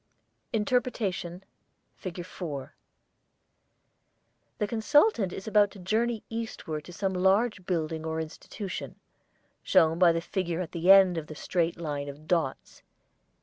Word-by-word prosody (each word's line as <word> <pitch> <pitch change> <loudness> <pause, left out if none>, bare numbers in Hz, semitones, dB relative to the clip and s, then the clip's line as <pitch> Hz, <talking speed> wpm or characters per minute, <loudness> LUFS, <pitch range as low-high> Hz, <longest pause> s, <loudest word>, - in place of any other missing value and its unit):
INTERPRETATION 210 -6 -1 0.5
FIG. 175 -1 -7
4 150 -7 -6 1.8
The 210 - 0
consultant 230 - +3
is 190 - -7
about 210 -1 +4
to 200 - -14
journey 220 +4 0
eastward 220 -9 -5
to - - -10
some 190 +2 -2
large 190 +1 +2
building 160 -3 -1
or 160 0 -2
institution, 185 +5 -6 0.7
shown 165 -3 +4
by 180 -2 +7
the 165 - 0
figure 170 -1 -2
at 180 -3 -4
the 170 +1 -1
end 190 -3 +7
of 155 - -9
the 155 - -8
straight 170 +1 -1
line 145 -3 -3
of 145 +2 -10
dots. 165 -7 -1
180 Hz, 130 wpm, -28 LUFS, 165-205 Hz, 1.8 s, by